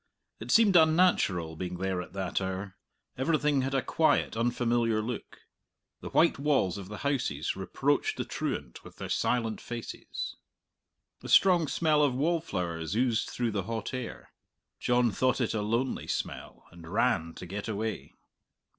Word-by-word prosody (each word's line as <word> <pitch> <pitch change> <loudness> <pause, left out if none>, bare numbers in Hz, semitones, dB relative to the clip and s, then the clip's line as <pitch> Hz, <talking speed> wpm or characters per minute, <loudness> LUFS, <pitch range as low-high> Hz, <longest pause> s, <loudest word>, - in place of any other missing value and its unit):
It - - -8
seemed 215 -4 +5
unnatural 160 - +4
being 90 +1 -4
there 95 0 -1
at 90 - -11
that 95 -1 -2
hour; 95 +1 -4 0.4
everything 150 -1 +2
had 135 +1 -1
a 135 - +1
quiet, 160 -7 +2
unfamiliar 120 -1 +1
look. 110 +1 -5 0.6
The - - -7
white 165 -3 +3
walls 135 - +1
of 95 - -8
the 105 - -6
houses 120 - 0
reproached - - 0
the - - -2
truant - - -4
with - - -13
their - - -7
silent 115 -3 0
faces. 120 -1 -6 0.8
A - - -8
strong 175 -5 +5
smell 155 0 +2
of 140 -4 +2
wallflowers 95 - -1
oozed 120 -1 +1
through 120 -2 -1
the 100 -3 -2
hot 115 +1 -3
air. 125 -2 -6 0.5
John 120 -1 +2
thought 130 +6 +1
it 120 - 0
a 110 - -1
lonely 115 +5 -1
smell, - - -4
and 85 -1 -12
ran 105 -7 +1
to - - -8
get 100 +4 -5
away. 110 0 -4
115 Hz, 155 wpm, -29 LUFS, 95-135 Hz, 0.8 s, seemed